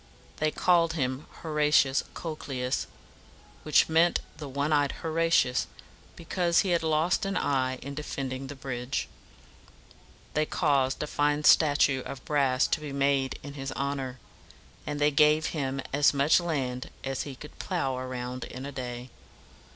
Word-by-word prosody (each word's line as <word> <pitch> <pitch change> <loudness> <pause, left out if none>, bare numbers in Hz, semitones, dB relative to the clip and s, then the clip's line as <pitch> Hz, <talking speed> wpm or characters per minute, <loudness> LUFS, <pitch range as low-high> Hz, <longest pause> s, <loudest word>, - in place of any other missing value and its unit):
They 155 - +1
called 170 0 +3
him 130 -2 -2 0.2
Horatius 150 -3 +3
Co´cles, 135 -6 -3 0.7
which 155 - +4
meant 165 +2 +3 0.2
the 150 -2 -7
"one 140 +3 0
eyed 145 -2 +2
Horatius," 165 -5 +2 0.5
because 170 0 +1
he 195 - -2
had 170 -1 +2
lost 160 +2 +1
an 195 -1 -1
eye 130 -2 0
in 140 +2 -6
defending 135 -2 -4
the 145 - -7
bridge; 130 0 -3 1.3
they 155 0 +1
caused 140 -5 +1
a - - -1
fine 145 0 0
statue 145 -4 +5
of 130 - -8
brass 135 -3 +2
to - - +1
be 150 -2 -6
made 140 -1 +1
in 140 0 -7
his 135 -1 -5
honor; 135 -2 -3 0.7
and 145 -1 -3
they 150 0 +3
gave 150 +2 +4
him 135 -3 -2
as 145 +1 +4
much 140 +5 +4
land 135 -7 -2
as 135 -1 -2
he 140 -2 -6
could 150 +3 -12
plow 150 -8 -1
around 125 -1 -5
in 130 +2 -8
a 140 - -5
day. 125 -2 -6
140 Hz, 150 wpm, -28 LUFS, 130-155 Hz, 1.3 s, statue